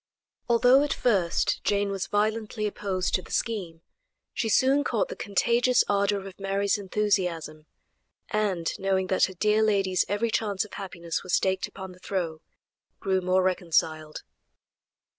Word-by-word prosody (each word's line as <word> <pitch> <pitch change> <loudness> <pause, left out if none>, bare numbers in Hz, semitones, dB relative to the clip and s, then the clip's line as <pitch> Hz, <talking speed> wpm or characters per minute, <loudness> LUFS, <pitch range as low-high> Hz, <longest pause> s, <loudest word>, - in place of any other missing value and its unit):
Although 245 +3 +5
at 290 - 0
first 195 -8 +1
Jane 205 0 +1
was 195 -1 -3
violently 215 +1 -1
opposed 195 -3 -2
to 185 - +2
the - - -16
scheme, 180 -8 -3 0.5
she 225 - -1
soon 270 +5 +3
caught - - 0
the 485 - -5
contagious 235 +4 +2
ardor 200 -1 +1
of 195 0 -11
Mary's 195 0 0
enthusiasm, 180 -6 -1 0.6
and 200 -6 0
knowing 190 -1 +1
that - - +4
her 190 - -8
dear 210 +4 +2
lady's 195 -4 +2
every 215 +3 0
chance 205 -3 0
of 210 - -16
happiness 170 -4 -5
was 185 - 0
staked 190 0 0
upon 190 -1 -9
the 180 - -16
throw, 175 -5 -3 0.6
grew 190 -2 0
more 185 +1 +2
reconciled. 160 -4 0
195 Hz, 145 wpm, -26 LUFS, 185-215 Hz, 0.6 s, Although